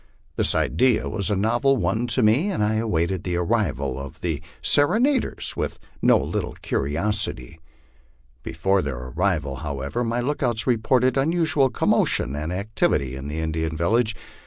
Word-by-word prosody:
This - - +1
idea 125 -2 +2
was 100 -2 0
a 105 - +1
novel 120 +7 +2
one 110 +4 0
to 120 +1 +1
me, 125 - +3
and 180 - -1
I 110 +1 +1
awaited 95 -4 -1
the 90 -1 -2
arrival 85 - -1
of 70 -1 -9
the 80 -4 -2 0.2
serenaders 235 - +1
with - - -3 0.2
no - - +5
little - - -3
curi 70 +2 -2
osity. 85 - -2 0.8
Before 95 +8 0
their 70 -5 -4
arrival, 75 +2 -1
however, 70 - -3
my 120 +1 -1
lookouts 120 -4 0
reported 125 +2 +2
unusual 150 -2 +2
commotion 70 - +1
and 75 +3 -4
activity 90 - 0
in 65 +1 -7
the 75 +2 -5
Indian 80 0 -2
village. 110 +7 +1
100 Hz, 150 wpm, -23 LUFS, 80-120 Hz, 0.8 s, no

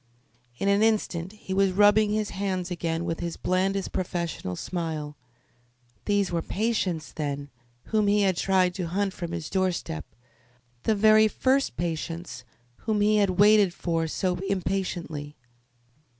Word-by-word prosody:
In 195 - -1
an 200 +1 +3
instant 205 -5 0
he 200 -3 -7
was 195 -1 +2
rubbing 205 +2 +5
his 210 -1 -1
hands 185 -2 -2
again 170 -1 -2
with 165 -1 -2
his 170 -1 -4
blandest 190 +1 0
professional 170 - -3
smile. 155 - -4 0.9
These 205 -2 +1
were 170 -1 0
patients, 190 -6 -1
then, 145 -2 -4 0.3
whom 215 -2 +1
he 205 +1 +3
had 190 -2 +2
tried 185 0 +2
to 180 -3 -3
hunt 195 +3 -1
from 170 -2 -5
his 170 -2 -4
doorstep 185 - -1 0.8
the 220 - +3
very 215 +1 +6
first 265 - +1
patients, 165 -4 -4 0.3
whom 215 -2 -1
he 210 +1 +4
had 195 -3 +2
waited 205 -3 +5
for 165 -2 -1
so 180 +2 -1
impatiently. 180 -6 -3
185 Hz, 140 wpm, -26 LUFS, 170-205 Hz, 0.9 s, very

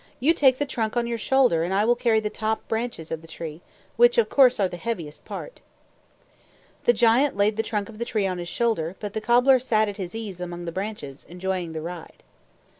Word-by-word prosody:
"You 300 +6 +4
take 265 -5 +4
the 290 - 0
trunk 230 -4 -2
on 240 - +1
your 235 -1 -3
shoulder, 255 -9 +3
and 175 - -2
I 205 +2 +3
will 240 +1 +4
carry 230 -2 +2
the 210 -1 -3
top 220 0 -2
and - - -36
branches 225 -8 -3
of 160 -1 -3
the 165 - -14
tree, 160 0 -8 0.4
which, 485 +1 +5
of 470 - +3
course, 255 -4 +5
are 195 - +3
the 180 - -7
heaviest 170 -8 -5
part." - - -8 1.2
The - - +7
giant 240 +3 +3
laid 205 +1 +2
the 220 - +1
trunk 210 -2 -3
of 225 -1 -12
the - - 0
tree 215 -4 -1
on 185 -2 -2
his 175 -1 -5
shoulder, 190 -6 -1
but 205 -2 -5
the 220 - -3
cobbler 250 +3 +5
sat 220 -3 +1
at 205 -1 -5
his 185 0 -6
ease 205 -5 -6
among 175 -1 -6
the 170 - -4
branches, 185 -8 -6
enjoying 180 -1 -3
the 160 - -4
ride. 170 0 -9
215 Hz, 230 wpm, -24 LUFS, 175-240 Hz, 1.2 s, The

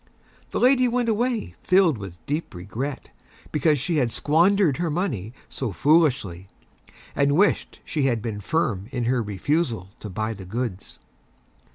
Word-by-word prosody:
The - - -2
Lady 255 0 +5
went 240 -1 0
away 235 +1 0
filled 180 - +3
with 95 -3 -8
Deep 150 - -3
Regret 115 +10 -5 0.4
because 150 0 +2
she 160 +5 -1
had 125 -5 +1
squandered 170 - +3
her 170 0 -1
Money 145 - -2 0.2
so 130 -5 -4
Foolishly, 120 - +2 0.7
and 140 +1 +2
wished 205 +3 +1
she 150 -4 -1
had 120 -4 +2
been 105 -2 -5
Firm 105 - -1
in 125 -3 -2
her 125 0 +2
Refusal 110 - -1
to 105 - -7
buy 110 +4 -2
the 95 -3 -10
Goods. 110 -1 -5
135 Hz, 150 wpm, -24 LUFS, 105-170 Hz, 0.7 s, Lady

